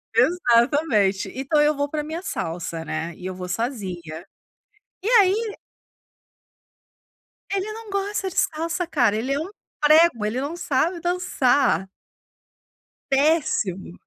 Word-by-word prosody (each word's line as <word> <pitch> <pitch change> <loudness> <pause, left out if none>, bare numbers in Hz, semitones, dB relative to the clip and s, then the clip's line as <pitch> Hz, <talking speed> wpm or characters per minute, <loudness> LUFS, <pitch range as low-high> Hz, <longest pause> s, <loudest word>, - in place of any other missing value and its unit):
Exatamente. 235 - +2
Então 275 +3 +1
eu 300 0 +3
vou 285 0 -1
pra 300 -1 -3
minha 320 +3 -5
salsa, 165 - -4
né, 160 +2 -4
e 180 - -10
eu 185 - -3
vou 180 0 -7
sozinha. 185 - -4 0.8
E 405 - -5
aí 415 +3 0 1.9
Ele 395 +2 -1
não 445 -1 -10
gosta 395 0 -2
de - - -11
salsa, 330 +2 0
cara. 245 -10 +2
Ele 255 +5 -1
é 280 - 0
um 335 +5 -4 0.3
prego, 305 -7 +5
ele 230 +5 -1
não 300 +5 -4
sabe 335 +3 0
dançar. 285 - +1 1.2
Péssimo. 270 - +1
285 Hz, 125 wpm, -23 LUFS, -, 1.9 s, prego